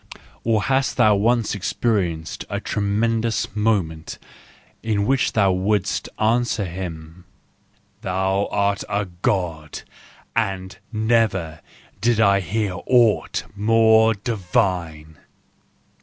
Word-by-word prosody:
Or 110 -2 +1
hast 135 +3 0
thou 110 - +5
once 115 +3 +1
experienced 95 -5 -2
a - - -2
tremendous 110 +1 -1
moment 95 -7 -1 0.6
in 105 -2 0
which 135 +2 +1
thou 100 -3 +3
wouldst 95 +1 0
answer 110 -1 +1
him: 85 -1 -7 0.4
" - - -39
Thou 95 +2 0
art 100 -1 0
a 105 0 0
God, 85 - -3 0.5
and 95 -4 -2 0.2
never 110 -7 0 0.4
did 115 -1 +1
I 100 -2 +4
hear 100 +1 -2
aught 120 -4 +3
more 110 +1 +4
divine!" 90 - -2
100 Hz, 100 wpm, -22 LUFS, 90-110 Hz, 0.6 s, thou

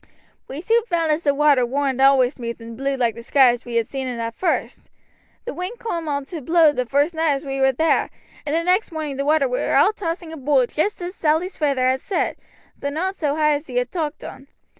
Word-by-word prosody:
"We 280 +4 -6
soon 455 +6 +2
found 335 -6 0
as 305 +2 0
the 285 -3 +1
water 285 -3 +4
warn't 265 +1 -1
always 270 -1 +5
smooth 235 -3 -6
and 230 0 -9
blue 275 +3 -1
like 240 -3 +1
the 235 - -10
sky 260 +2 +5
as 240 0 -2
we 240 -1 -6
had 230 -1 +2
seen 265 +2 -5
it 250 -2 -4
at 230 0 -3
first. 365 - -2 0.6
The - - -4
wind 365 +7 -5
coom 340 -9 -4
on 285 -2 -2
to 320 +2 -7
blow 325 +2 +4
the 250 -3 -1
vurst 285 +7 +1
night 320 -2 +1
as 275 +2 -4
we 270 0 -3
war 265 0 +5
thar, 315 +6 +1 0.3
and 295 +1 -2
the 335 - +1
next 365 +4 +1
morning 305 -4 -4
the 275 - -2
water 300 -2 +3
war 250 0 -1
all 365 +10 +5
tossing 335 -4 -5
aboot 275 -4 +1
joost 360 +4 -1
as 355 +1 -5
Sally's 330 +2 0
feyther 275 -4 +1
had 260 +1 +1
said, 395 - -1 0.4
though 280 - -2
not 365 +7 -2
so 295 -5 -1
high 305 -1 +3
as 290 +2 -3
he 250 - -8
had 245 0 0
talked 315 -4 -4
on. 270 - -10
290 Hz, 240 wpm, -21 LUFS, 260-325 Hz, 0.6 s, always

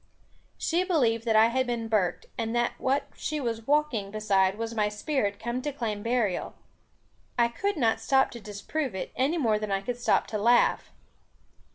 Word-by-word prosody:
She 345 +2 +1
believed 245 - +1
that 225 -2 +2
I 220 +1 +6
had 260 +1 0
been 235 -2 -2
burked, 210 -5 0
and 225 0 -2
that 240 0 +2
what 270 +2 0
she 305 - -3
saw 240 -5 -1
walking 285 -9 +1
beside 200 -2 +1
was 230 0 -4
my 210 -2 +1
spirit 210 -1 -1
come 240 +2 -3
to 295 - -2
claim 220 -6 -3
burial. 230 -4 -1 0.8
I 235 -1 +4
could 395 - -2
not 230 -5 +2
stop 270 0 +2
to 235 - -8
disprove 210 +5 -4
it, 190 - -4
any 280 +7 +1
more 225 -8 +2
than 210 -1 -4
I 195 0 0
could 245 +3 -4
stop - - +2
to 215 - -2
laugh. 240 +3 +3
235 Hz, 185 wpm, -27 LUFS, 215-265 Hz, 0.8 s, I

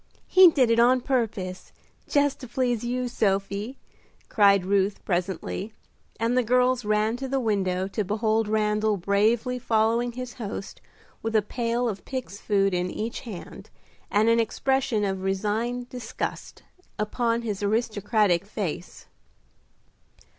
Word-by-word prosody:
He 370 -1 +8
did 260 -7 +3
it 230 - +3
on 250 +2 +5
purpose, 220 -8 -2 0.4
just 285 -1 +2
to 255 - -8
please 245 -2 -1
you, 250 +1 -1
Sophie," 200 +2 -1 0.5
cried 200 -3 +4
Ruth 195 +1 0
presently, 185 +3 -2 0.5
and 230 +2 +1
the 255 - +4
girls 250 +1 +2
ran 215 +2 +1
to 265 +1 -4
the 270 +1 0
window 190 -5 0
to 210 - -2
behold 215 +2 0
Randal 210 0 +1
bravely 220 +7 +1
following 230 +1 +1
his 250 0 -6
host 205 -4 -7 0.4
with 225 0 -3
a 215 - +4
pail 235 +2 -1
of 205 -4 -4
pigs' 255 -7 -6
food 195 -2 +2
in 180 0 0
each 225 +6 -4
hand, 215 -8 -9 0.4
and 210 +2 +3
an 230 0 +4
expression 235 -1 0
of 190 -1 -2
resigned 215 +6 -1
disgust 245 -3 -6 0.3
upon 230 +2 0
his 210 -4 -3
aristocratic 210 -3 +1
face. 185 -5 -5
220 Hz, 135 wpm, -26 LUFS, 200-245 Hz, 0.5 s, He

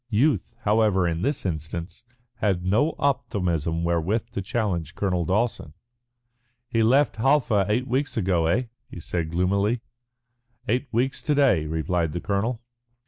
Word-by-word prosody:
Youth, 130 +7 +1
however, 105 -4 +3
in 85 0 -2
this 140 +1 -1
instance 85 +3 -4 0.3
had 95 -4 0
no 115 +12 +2
optimism 85 - 0
wherewith 85 +6 0
to 100 - -3
challenge 95 -5 -2
Colonel 90 -4 0
Dawson. 95 -6 -1 0.9
"He 115 -1 0
left 130 +5 +3
Halfa 115 -6 +3
eight 120 +5 +1
weeks 135 +2 -1
ago, 90 -5 +1
eh?" 110 +10 +2 0.3
he - - -9
said 85 0 -3
gloomily. 100 +7 +1 0.9
"Eight 125 +6 0
weeks 125 +4 0
to 150 - 0
day," 120 - +3
replied 80 0 -1
the 85 - -2
colonel. 110 +6 -2
100 Hz, 140 wpm, -25 LUFS, 85-120 Hz, 0.9 s, however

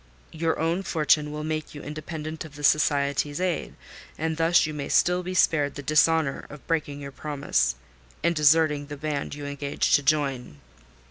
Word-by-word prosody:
Your 160 0 -1
own 165 +4 0
fortune 150 -4 +1
will 150 0 -5
make 155 0 -4
you 145 - -8
independent 155 +1 -6
of 155 -3 -12
the 145 - -10
Society's 145 0 +2
aid; 180 -2 -2 0.4
and 160 0 -1
thus 165 +1 +4
you 155 - -4
may 145 -2 -5
still 180 +1 +3
be 185 +1 -5
spared 145 -5 +2
the 145 - -7
dishonour 155 0 +2
of 150 -1 -12
breaking 145 -3 -2
your 140 0 -7
promise 140 - -1 0.5
and 170 - +3
deserting 150 -1 +3
the 145 0 -7
band 145 -1 -3
you 145 -1 -7
engaged 145 0 -1
to - - +5
join." 140 - 0
150 Hz, 175 wpm, -25 LUFS, 145-160 Hz, 0.5 s, to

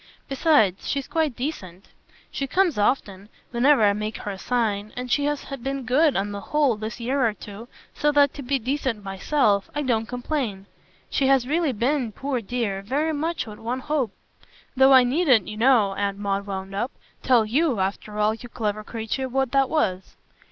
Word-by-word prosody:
Besides, 270 - +2
she's 275 -2 -2
quite 315 -6 0
decent; 200 - -6 0.4
she 275 - -3
comes 355 - +1
often 205 -3 0 0.2
whenever 250 +1 +4
I 205 -1 +5
make 215 +1 -4
her 205 - -5
a 190 - -8
sign; 215 -4 -1
and 250 0 -4
she 285 - +2
has 295 -1 -2 0.2
been 270 0 -3
good, 280 +4 +3
on 200 +1 -1
the 200 0 -5
whole, 290 0 +1
this 220 +3 -6
year 260 +3 0
or 225 -3 +1
two, 210 +2 -10 0.3
so 295 0 +1
that, 285 -1 +4
to 285 - -7
be 275 +1 0
decent 255 -3 -2
myself, 200 +1 +1
I 295 - -1
don't 225 -4 0
complain. 245 -5 -3 0.5
She 270 - +1
has 265 -2 +3
really 315 0 +1
been, 245 0 -1
poor 270 -1 -3
dear, 210 -3 -2
very 290 +10 -1
much 325 +3 -2
what 210 -2 -10
one 245 +3 -3
hoped; 270 -8 -2 0.6
though 265 +1 +6
I 260 -1 +8
needn't, 255 - +3
you 210 +1 -6
know," 225 -4 +4
Aunt 200 0 -2
Maud 200 0 -2
wound 190 0 -5
up, 235 +7 -2 0.3
"tell 245 -4 +4
YOU, 260 +1 +1
after 200 +2 -3
all, 210 +1 +2
you 240 +2 -10
clever 215 -3 -3
creature, 230 +4 -4
what 265 0 0
that 270 -1 +3
was." 190 -12 -1
245 Hz, 185 wpm, -24 LUFS, 210-275 Hz, 0.6 s, I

